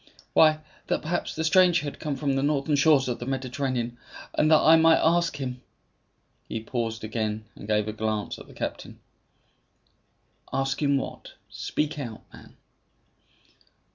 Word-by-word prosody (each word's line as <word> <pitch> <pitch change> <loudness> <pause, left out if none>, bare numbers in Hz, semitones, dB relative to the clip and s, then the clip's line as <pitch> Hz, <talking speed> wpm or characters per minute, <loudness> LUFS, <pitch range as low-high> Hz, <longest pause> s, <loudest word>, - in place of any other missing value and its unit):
"Why, 155 -1 +5 0.3
that - - -1
perhaps 175 +3 -2
the 160 - -2
stranger 175 0 +4
had 145 - -6
come 150 -3 -3
from 140 -1 -1
the 135 - +1
northern 145 +1 +1
shores 140 -2 +4
of 125 - -2
the 120 - -6
Mediterranean, 130 -2 -2 0.3
and 155 - +2
that 155 - +7
I 160 - +6
might 165 0 +6
ask 170 +1 +2
him 125 -2 -5 0.4
" - - -44
He 115 - -3
paused 115 -1 -3
again, 110 -1 -3
and 100 - -10
gave 105 -1 +1
a 110 - -3
glance 110 -1 -3
at - - -12
the - - -14
captain. - - -5 1.5
"Ask 135 +1 -1
him 140 -1 +3
what? 135 - -6 0.2
Speak 150 0 -3
out, 115 -6 -7
man?" - - -15
135 Hz, 160 wpm, -26 LUFS, 115-155 Hz, 1.5 s, that